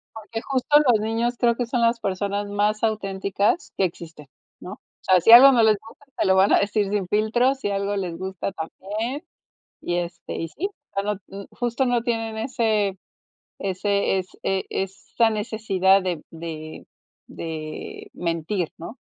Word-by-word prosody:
Porque 220 +1 -6
justo 275 +3 +2
los 220 -3 +5
niños 230 +3 -1
creo 235 -1 +3
que 245 0 -1
son 240 0 -1
las 230 0 +3
personas 200 +1 -2
más 210 +1 0
auténticas 200 - 0
que 190 - +3
existen, 165 -4 -8 0.3
¿no? - - -8
O - - -13 0.2
sea, 185 -2 +4
si 225 - +5
algo 265 +4 +11
no 235 -3 +4
les 215 -1 +5
gusta, 225 +6 -16
te - - +1
lo 190 - +4
van 190 +1 +5
a - - +6
decir 205 0 0
sin 200 -3 -1
filtros, 240 +6 +2
si 205 - -2
algo 200 +1 -1
les 180 -4 -3
gusta 190 0 -4
también 215 - -5 0.6
y, 175 - -1
este, 175 0 -5
y 165 - -3
sí. 385 - -3 0.3
Ya 200 - 0
no 210 0 -1
mm, 195 0 -8
justo 245 +2 -1
no 245 -2 +1
tienen 225 -2 -2
ese 220 -5 0 0.6
ese 195 0 0
es 185 - -4
e 195 -1 0
esa 195 +4 0
necesidad 200 -3 +2
de 175 -4 -3
de 160 -1 -8 0.4
de 155 -2 -7
mentir, 170 +1 -2
¿no? 195 +10 -8
205 Hz, 170 wpm, -23 LUFS, 190-230 Hz, 0.6 s, algo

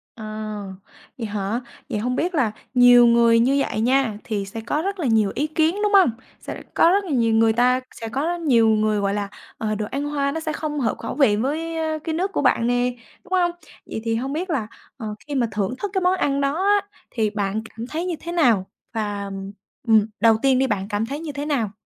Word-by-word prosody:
À, 215 -1 -6 0.6
vậy 230 -4 -4
hả? 205 +3 -2 0.3
Vậy 210 - -2
hông 250 +3 -1
biết 350 +4 -1
là 250 -8 +2 0.2
nhiều 245 -1 +7
người 235 -1 +5
như 255 +4 +3
vậy 215 - -2
nha, 250 -3 +2
thì 205 -3 -3
sẽ 210 +3 -7
có 290 +7 -1
rất 395 +1 -3
là 295 - 0
nhiều 220 -4 +3
ý 295 - 0
kiến, 315 +2 +1
đúng 415 -1 +1
hông? 380 -10 +6 0.3
Sẽ - - -6
lại - - -9
có - - +5
rất 400 +2 +2
là 365 - -8
nhiều 230 -4 +2
người 225 0 +4
ta 250 +2 +3 0.2
sẽ 225 - -4
có 265 +4 -2
rất 345 +1 -2
nhiều 240 -8 +4
người, 215 -1 +2
gọi 200 0 0
là, 205 -1 -2 0.3
ờ, 215 -1 -2
đồ 210 0 -2
ăn 280 +1 -2
Hoa 285 -1 -1
nó 320 - -3
sẽ 310 -1 -3
không 300 -1 -3
hợp 230 -5 0
khẩu - - -5
vị 270 -8 +4
với, 315 +8 -2
a, 315 -1 -1
cái 320 -1 -2
nước 380 +4 -1
của - - -1
bạn 250 -3 +2
nè, 245 +1 +1 0.3
đúng 375 -1 -8
hông? 355 -2 +3 0.3
Vậy 220 - -5
thì 225 -1 0
hông 265 +4 -2
biết 350 +4 -3
là, 260 -10 -1 0.3
ờ, 215 -4 -5
khi 290 - -4
mà 245 -3 +2
thưởng 200 +2 -1
thức 410 - -3
cái 380 - +1
món 365 +1 +3
ăn 280 -4 0
đó 280 +6 0
á, 405 0 +3 0.2
thì 220 -3 0
bạn 205 0 -2
cảm 230 +2 -8
thấy 325 +5 -3
như 355 -2 -2
thế 340 - -6
nào? 235 - +3 0.3
Và, 205 -2 -2
ừm, 195 0 -6 0.4
ừm, 220 -2 +5
đầu 225 -1 +5
tiên 265 -1 +3
đi 265 - +2
bạn 200 -4 -2
cảm 210 +1 -1
thấy 280 +5 -5
như 315 -2 -5
thế 285 +1 -5
nào? 245 -9 0
245 Hz, 245 wpm, -22 LUFS, 220-310 Hz, 0.6 s, nhiều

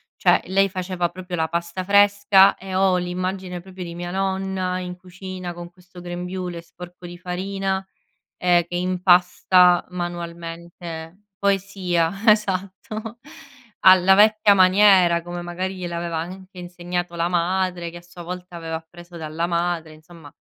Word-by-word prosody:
cioè - - +4
lei 195 +1 +2
faceva 185 -2 -2
proprio 180 0 -7
la 160 -1 -1
pasta 170 +2 -3
fresca 200 0 +5
e 190 0 -9
ho 190 -1 +3
l'immagine 180 +1 -3
proprio 185 +1 -9
di 170 -1 -7
mia 175 +1 -6
nonna 190 -1 -2
in 180 -1 -6
cucina, 185 0 -8
con 175 0 -9
questo 180 0 -16
grembiule 180 0 -5
sporco 175 +1 -12
di 175 0 -9
farina, 190 +2 -3 0.5
ehm, 175 -1 +3
che 175 - -7
impasta 180 0 +4
manualmente 170 0 -7
poesia 195 -4 0 0.2
esatto, 210 +2 0 0.6
alla 185 0 +7
vecchia 215 0 +5
maniera 185 -2 +5
come 175 +1 -6
magari 180 +2 -4
gliel'aveva 170 -2 -4
anche 185 +3 -8
insegnato 175 0 -5
la 170 0 0
madre, 180 0 -1
che 175 - -10
a - - -11
sua 175 0 -13
volta 180 0 -8
aveva 165 -1 -5
appreso 175 +2 -13
dalla 160 +1 -3
madre, 170 -2 -1
insomma, 155 -1 -15
180 Hz, 140 wpm, -22 LUFS, 175-190 Hz, 0.6 s, alla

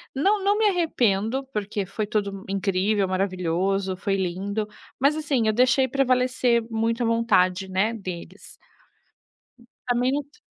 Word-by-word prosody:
não 395 +9 +2
não 405 +1 +3
me 435 -1 +4
arrependo, 255 - 0
porque 205 -1 -2
foi 205 +3 -4
tudo 205 -1 -1
m 195 -1 -9
incrível, 195 +1 0
maravilhoso, 185 0 -1
foi 195 +1 -1
lindo. 195 +3 -2 0.3
Mas 280 +4 +2
assim, 280 -7 0
eu 215 - +3
deixei 255 +3 +4
prevalecer 250 -2 +2
muito 230 +2 0
a - - +1
vontade, 195 -5 +2
né, 195 +5 +1
deles. 185 -6 -8 1.4
A - - +4
mente 275 - -1
215 Hz, 135 wpm, -24 LUFS, 195-255 Hz, 1.4 s, me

